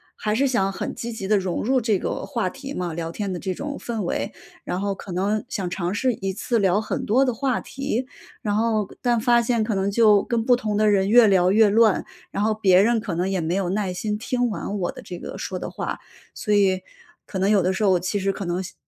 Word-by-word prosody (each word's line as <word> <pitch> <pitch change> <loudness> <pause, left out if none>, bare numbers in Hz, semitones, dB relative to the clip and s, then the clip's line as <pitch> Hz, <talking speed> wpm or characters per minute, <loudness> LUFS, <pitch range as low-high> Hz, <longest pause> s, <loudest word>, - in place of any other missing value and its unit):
还 210 0 -2
是 270 +5 +2
想 195 -7 +1
很 - - -4
积 235 - -5
极 220 -4 -5
地 210 0 +4
融 185 -2 -2
入 255 +2 +2
这 215 -3 +2
个 - - -3
话 230 -8 -2
题 275 +5 -8
嘛， 175 -2 -3
聊 165 0 -4
天 200 +2 -3
的 180 - -4
这 185 - -3
种 285 +9 -5
氛 230 -2 -4
围。 175 - -2 0.3
然 180 - -3
后 200 0 -1
可 190 - -9
能 200 +4 0
想 185 -3 -3
尝 175 0 -2
试 250 +4 +1
一 195 -3 -3
次 230 +4 -1
聊 195 -1 +3
很 215 - -3
多 250 +6 +3
的 250 - 0
话 255 +1 0
题， 265 -2 -3 0.4
然 205 -1 -1
后 215 -2 +1
但 240 -2 +2
发 240 +1 +4
现 235 -1 +1
可 215 0 -1
能 195 +1 0
就 210 -2 +5
跟 235 -2 -1
不 245 - +5
同 220 -4 -2
的 215 0 +4
人 195 -1 +2
越 235 0 +7
聊 185 -2 +4
越 215 +1 +5
乱， 220 -1 +3 0.3
然 200 - -1
后 220 0 +2
别 190 -3 +4
人 235 +2 +3
可 205 -6 -4
能 180 +3 0
也 190 -1 0
没 165 +2 -1
有 190 -2 0
耐 195 -1 -1
心 210 +3 -2
听 245 +2 -1
完 205 -1 -4
我 175 - -1
的 - - -11
这 175 - -8
个 - - -7
说 - - -4
的 - - -5
话。 - - -4 0.3
所 210 - -2
以 190 -2 +3 0.4
可 190 - -5
能 195 +2 +2
有 210 -2 +4
的 185 - +2
时 190 - -2
候， 200 - +4
我 180 - +3
其 185 +4 -2
实 195 0 +1
可 195 0 -6
能 175 +1 -1
希 190 - -9
205 Hz, 275 characters per minute, -23 LUFS, 190-230 Hz, 0.4 s, 越